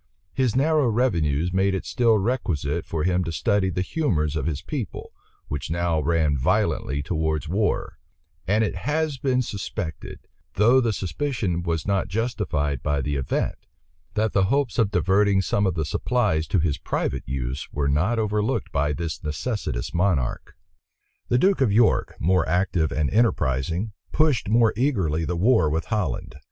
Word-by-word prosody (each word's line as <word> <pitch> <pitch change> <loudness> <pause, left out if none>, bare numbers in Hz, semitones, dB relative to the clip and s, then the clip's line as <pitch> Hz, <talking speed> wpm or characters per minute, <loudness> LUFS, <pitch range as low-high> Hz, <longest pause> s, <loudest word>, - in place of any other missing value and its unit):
His 130 -4 +1
narrow 150 0 +3
revenues 90 - +1
made 95 +1 +2
it 95 - -4
still 115 -4 +3
requisite 90 - -1
for 80 -2 -2
him 90 0 +1
to 85 - -3
study 95 +4 +1
the 90 0 -1
humors 85 - 0
of 75 -2 -1
his 75 -3 -3
people, 135 - -5 0.3
which 70 -1 -4
now 85 -1 0
ran 80 -2 +1
violently 75 - 0
towards 80 -1 -1
war; 100 +6 -1 0.5
and 105 +3 +3
it 105 - -1
has 150 -2 -1
been 130 -2 +1
suspected, 95 -6 -6 0.3
though 120 +6 +5
the 115 -2 +1
suspicion 100 - -2
was 85 -3 -2
not 100 -2 0
justified 90 - -1
by 75 -1 0
the 75 +2 -2
event, 70 -2 -2 0.5
that 110 0 +1
the 95 -1 +3
hopes 135 +2 0
of 110 -3 +3
diverting 100 0 +3
some 100 +1 +1
of 90 - -1
the 80 -2 -1
supplies 90 - 0
to 100 - +1
his 80 -4 0
private 65 - -2
use 65 0 -4
were 70 -1 -1
not 85 +12 +1
overlooked 105 -1 -1
by 75 +1 0
this 80 -1 -4
necessitous 75 - -3
monarch. 85 -8 0 0.7
The 120 - +2
duke 190 +2 +3
of 125 -6 +3
York, 110 +2 +3
more 90 0 +2
active 90 -2 +1
and 75 -2 0
enterprising, 90 - +1 0.2
pushed 150 -9 +2
more 115 0 +4
eagerly 95 - 0
the 90 +1 -2
war 110 -4 +4
with 80 +2 -1
Holland. 105 -8 -3
95 Hz, 160 wpm, -24 LUFS, 80-115 Hz, 0.7 s, though